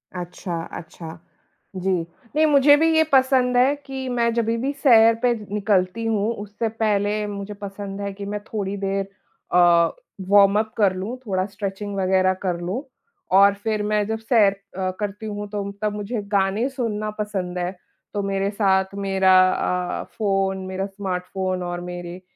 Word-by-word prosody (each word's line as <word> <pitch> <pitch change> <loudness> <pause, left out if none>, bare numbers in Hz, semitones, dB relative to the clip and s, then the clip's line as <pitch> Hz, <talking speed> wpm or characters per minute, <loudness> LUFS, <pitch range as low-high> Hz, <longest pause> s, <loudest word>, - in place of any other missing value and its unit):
अच्छा, 175 -1 -5 0.2
अच्छा, 165 0 -9 0.6
जी। 190 +1 -1 0.4
नहीं 310 +1 +4
मुझे 290 -1 +6
भी 325 +2 +3
ये 320 - +6
पसंद 260 -2 +4
है 260 +3 +4
कि 265 -1 -5
मैं 235 -1 +1
जभी 230 0 0
भी 265 +4 -1
सैर 230 -5 +6
पे 245 -1 +4 0.2
निकलती 205 +1 +1
हूँ 220 0 +1
उससे 210 +2 -3
पहले 210 0 +1
मुझे 200 0 -6
पसंद 200 0 -7
है 200 - -3
कि 200 +1 -7
मैं 205 +1 -3
थोड़ी 205 -2 -4
देर 195 0 -2 0.5
अ, 170 -1 +5 0.4
वॉर्मअप 205 +2 +5
कर 200 -4 +3
लूँ, 205 +7 -4
थोड़ा 185 -2 0
स्ट्रेचिंग 200 0 -5
वग़ैरह 185 -1 +2
कर 180 -2 -1
लूँ 195 - -3 0.5
और 200 +1 +7
फिर 215 -2 0
मैं 210 0 +1
जब 220 0 -2
सैर 225 -3 +4 0.3
अ, 185 -1 -1
करती 205 +1 -4
हूँ 205 -1 -5
तो 200 -1 -4
तब 210 -1 0
मुझे 210 +2 -3
गाने 200 +4 +2
सुनना 220 -5 -3
पसंद 190 -4 -3
है। 180 0 -1 0.4
तो 205 - -1
मेरे 195 0 -1
साथ 190 -2 +1
मेरा 195 -1 +2 0.7
अ, - - -6
फ़ोन 195 -2 +1
मेरा 190 +1 -3
स्मार्टफ़ोन 185 -1 -3
और 175 0 -4
मेरे 175 0 -7
200 Hz, 160 wpm, -23 LUFS, 190-220 Hz, 0.7 s, और